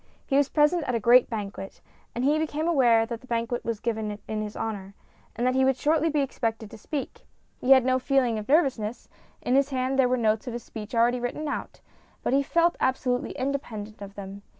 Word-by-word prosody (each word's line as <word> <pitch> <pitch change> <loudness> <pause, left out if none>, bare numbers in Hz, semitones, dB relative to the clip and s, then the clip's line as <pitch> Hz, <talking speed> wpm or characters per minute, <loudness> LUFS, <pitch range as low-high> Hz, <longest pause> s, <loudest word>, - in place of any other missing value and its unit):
He 270 - -1
was 285 0 +3
present 310 +3 +3
at 250 - -1
a - - +1
great 240 +3 +5
banquet, 200 -3 -6 0.4
and 240 - -2
he 295 +3 +3
became 315 0 -2
aware 240 -8 +4
that 230 0 -6
the 255 - -16
banquet 235 0 -2
was 230 -2 -3
given 215 -3 -3
in 215 0 -2
his 210 0 -6
honour, 200 -3 -5 0.4
and 240 - -1
that 255 - +2
he 265 0 +3
would 265 -1 +2
shortly 315 +3 +2
be 300 -2 +1
expected 225 -5 -3
to - - -10
speak. 285 +4 -6 0.3
He 250 - -3
had 260 -2 +4
no 255 0 +2
feeling 255 -4 +1
of 210 - -9
nervousness; 260 -8 +1 0.4
in 250 - 0
his 275 +1 +3
hand 260 0 -1
were 255 -1 +3
the 235 - -3
notes 215 +3 +1
of 245 - -4
his 240 -1 -5
speech 220 +2 -8
already 240 +2 +3
written 245 +6 -3
out, 285 - -5 0.4
but - - 0
he 275 - +4
felt 335 +4 +2
absolutely 255 0 0
independent 240 -7 -4
of 200 0 -9
them. 200 0 -8
250 Hz, 220 wpm, -26 LUFS, 220-275 Hz, 0.4 s, great